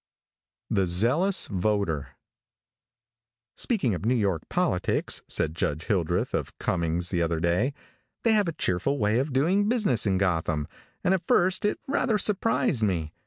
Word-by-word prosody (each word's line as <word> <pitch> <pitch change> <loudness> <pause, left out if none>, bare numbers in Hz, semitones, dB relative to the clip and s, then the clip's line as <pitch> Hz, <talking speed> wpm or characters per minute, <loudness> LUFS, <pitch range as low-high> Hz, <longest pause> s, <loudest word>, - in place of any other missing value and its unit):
THE 95 -2 +2
ZEALOUS 125 - +2
VOTER. 90 -8 -1 1.4
|SPEAKING 190 - +1
of 90 - -4
New 120 +4 +2
York 100 -8 0
politics," - - 0
said 80 - +1
Judge 80 -2 -2
Hildreth, 90 -5 -1
of - - -3
Cummings, 85 0 -1
the 90 -2 0
other 85 -1 0
day, 90 - 0 0.5
"they 230 - +3
have 210 -3 +2
a - - 0
cheerful 115 - 0
way 110 0 +1
of 140 +3 -2
doing 180 +11 +2
business 200 - +1
in 95 -1 +2
Gotham, 80 -5 0 0.4
and 185 - +3
at 180 -2 -2
first 185 +3 +2
it 210 - +1
rather 255 -5 +1
surprised 140 - +1
me. 85 -7 -1
105 Hz, 150 wpm, -26 LUFS, -, 1.4 s, they